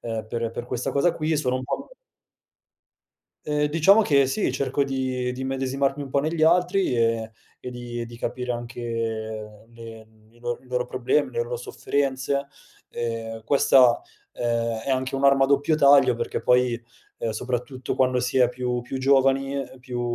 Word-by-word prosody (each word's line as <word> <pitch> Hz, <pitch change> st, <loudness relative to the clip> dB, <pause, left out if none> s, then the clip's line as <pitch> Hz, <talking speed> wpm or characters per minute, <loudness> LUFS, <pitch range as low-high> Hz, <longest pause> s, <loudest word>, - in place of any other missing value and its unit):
ehm, 115 Hz, -2 st, -4 dB
per 115 Hz, 0 st, -3 dB
per 120 Hz, -, -6 dB
questa 125 Hz, -1 st, -3 dB
cosa 155 Hz, +5 st, +2 dB
qui, 155 Hz, 0 st, 0 dB
sono 130 Hz, -4 st, 0 dB
un 130 Hz, -, -2 dB
po' -, -, -5 dB, 1.5 s
Ehm, 150 Hz, 0 st, +1 dB
diciamo 165 Hz, +8 st, +5 dB
che 140 Hz, -9 st, +4 dB
sì, 170 Hz, +11 st, 0 dB
cerco 140 Hz, +1 st, 0 dB
di 130 Hz, -2 st, -2 dB
di 130 Hz, +1 st, -6 dB
immedesimarmi 135 Hz, +1 st, -1 dB
un 135 Hz, -, -7 dB
po' 140 Hz, +1 st, +1 dB
negli 155 Hz, +2 st, -1 dB
altri, 180 Hz, -1 st, +3 dB
e 115 Hz, -1 st, +1 dB, 0.3 s
e 125 Hz, -, -6 dB
di 120 Hz, -1 st, -6 dB
e 115 Hz, -, -4 dB
di 120 Hz, 0 st, -11 dB
capire 125 Hz, +1 st, -3 dB
anche 120 Hz, 0 st, -6 dB
le 115 Hz, 0 st, -6 dB
n 110 Hz, 0 st, -26 dB
i 120 Hz, -, -23 dB
lor 120 Hz, +1 st, -4 dB
i -, -, -21 dB
loro 125 Hz, 0 st, -1 dB
problemi, 130 Hz, +4 st, 0 dB
le 475 Hz, -, -1 dB
lo 485 Hz, +1 st, -5 dB
sofferenze, 140 Hz, -, -1 dB, 0.4 s
ehm, 115 Hz, -1 st, -5 dB
questa, 130 Hz, -2 st, +5 dB, 0.3 s
ehm, 115 Hz, -1 st, -1 dB
è 140 Hz, -, -2 dB
anche 130 Hz, +1 st, -1 dB
un'arma 135 Hz, 0 st, +4 dB
a -, -, +2 dB
doppio 145 Hz, +3 st, +2 dB
taglio 140 Hz, -4 st, +6 dB
perché 120 Hz, 0 st, -3 dB
poi, 125 Hz, -1 st, +2 dB, 0.4 s
ehm, 115 Hz, -, -2 dB
soprattutto 125 Hz, +3 st, -3 dB
quando 130 Hz, -1 st, +2 dB
si 125 Hz, +1 st, 0 dB
è 125 Hz, -2 st, +5 dB
più 125 Hz, 0 st, -2 dB
più 125 Hz, +2 st, -6 dB
giovani, 135 Hz, +1 st, +2 dB
ehm, 130 Hz, -1 st, -6 dB
più 125 Hz, -1 st, -5 dB
130 Hz, 175 wpm, -24 LUFS, 120-140 Hz, 1.5 s, taglio